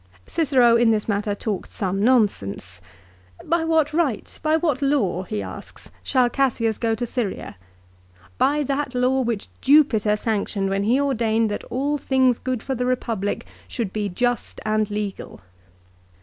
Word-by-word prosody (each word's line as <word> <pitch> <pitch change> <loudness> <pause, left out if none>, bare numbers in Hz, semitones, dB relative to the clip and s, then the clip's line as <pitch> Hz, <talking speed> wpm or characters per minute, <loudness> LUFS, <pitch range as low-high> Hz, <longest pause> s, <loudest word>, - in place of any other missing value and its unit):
Cicero 255 -7 +3
in 235 -1 +4
this 215 -2 +1
matter 205 -1 -1
talked 205 -2 -4
some 195 -1 -2
nonsense. 100 - +1 0.3
" - - -29 0.3
By 335 0 +1
what 320 -2 +2
right, 305 -9 -1
by 310 0 +2
what 305 -5 0
law," 270 -11 +1
he 210 +3 -4
asks. - - -10
" - - -31
shall 255 -2 +3
Cassius 240 -4 0
go 225 -1 +1
to 240 - -3
Syria? 230 - -4 0.8
By 295 +2 +2
that 275 -1 -2
law 255 +2 +2
which 235 -4 -2
Jupiter 255 -8 +4
sanctioned 205 -3 -1
when 195 +1 0
he 245 +5 +3
ordained 230 -5 +1
that 205 - -4
all 285 +3 -1
things 260 -3 +2
good 255 -3 -3
for 270 - -2
the 250 -1 -2
Eepublic 230 -5 -1 0.2
should 225 -6 -4
be 210 -2 -2
just 245 +6 -2
and 215 -1 +1
legal." 205 - -5
235 Hz, 160 wpm, -23 LUFS, 210-265 Hz, 0.8 s, in